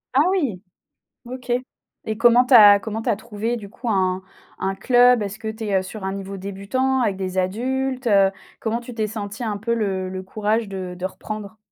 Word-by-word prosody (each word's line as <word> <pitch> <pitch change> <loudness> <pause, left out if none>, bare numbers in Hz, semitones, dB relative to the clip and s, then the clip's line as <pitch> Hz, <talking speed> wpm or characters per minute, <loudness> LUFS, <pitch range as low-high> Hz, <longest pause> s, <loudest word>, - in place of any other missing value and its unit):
Ah 275 - +6
oui! 280 - 0 0.6
OK 250 0 -8 0.5
et 220 - -3
comment 240 +2 +5
tu 250 - +4
as 205 -3 +9
comment 220 +3 -5
tu - - 0
as - - +1
trouvé 225 +2 -3
du 205 -3 -8
coup 235 +3 -7
un 185 -2 +1 0.4
un 195 0 -1
club? 245 +1 +5
Est-ce 200 0 -5
que 220 - -4
tu 220 +1 -5
es, 205 -2 +1
heu, - - -1
sur 190 +2 -8
un 190 - -2
niveau 195 0 -6
débutant 200 +8 -1
avec 200 -5 0
des 190 -1 -4
adultes, 255 +7 -1
heu? 195 -3 +5 0.3
Comment 225 +1 -1
tu 245 0 -9
t'es 215 -2 -1
sentie 210 +1 -6
un 210 -2 -2
peu 235 +3 -1
le 195 -4 -1
le 185 0 -5
courage 215 +3 -1
de 185 -2 -5
de 180 - -7
reprendre? 215 +2 -6
215 Hz, 210 wpm, -22 LUFS, 195-240 Hz, 0.6 s, as